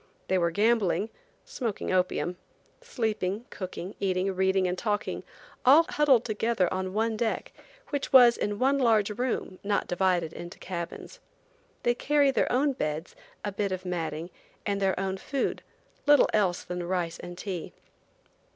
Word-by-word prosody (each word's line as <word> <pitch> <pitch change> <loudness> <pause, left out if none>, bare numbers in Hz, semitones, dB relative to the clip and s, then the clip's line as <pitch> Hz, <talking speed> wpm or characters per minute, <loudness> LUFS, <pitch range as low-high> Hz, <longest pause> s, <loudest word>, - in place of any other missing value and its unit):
They 190 - +3
were 170 -1 +2
gambling, 210 +2 +2 0.3
smoking 245 - -3
opium, 180 -1 0 0.4
sleeping, 220 - -2
cooking, 185 0 -6
eating, 190 0 0
reading 190 0 +2
and 180 - -1
talking, 210 +1 -2 0.4
all 295 +6 +7
huddled 275 -6 +4
together 220 -3 +1
on 185 +1 -3
one 225 +1 +1
deck, 225 0 -2 0.4
which 285 -2 -3
was 245 -3 +8
in 205 0 -2
one 275 +4 +2
large 220 -5 +3
room, 225 -4 -2
not 200 0 0
divided 175 -3 +1
into 175 +1 -8
cabins. 175 - -6 0.6
They 240 - +3
carry 285 +2 +3
their - - +1
own 275 +3 +2
beds, 155 -5 -3 0.3
a 205 - -1
bit 200 0 -2
of 185 0 -4
matting, 170 -1 -3 0.3
and 200 -1 -1
their 190 -1 +1
own 190 0 -2
food, 270 +7 -2 0.5
little 290 -1 +6
else 190 -5 +2
than 180 0 -4
rice 175 -2 -2
and 175 0 -8
tea. 185 -4 -5
200 Hz, 150 wpm, -28 LUFS, 180-235 Hz, 0.6 s, was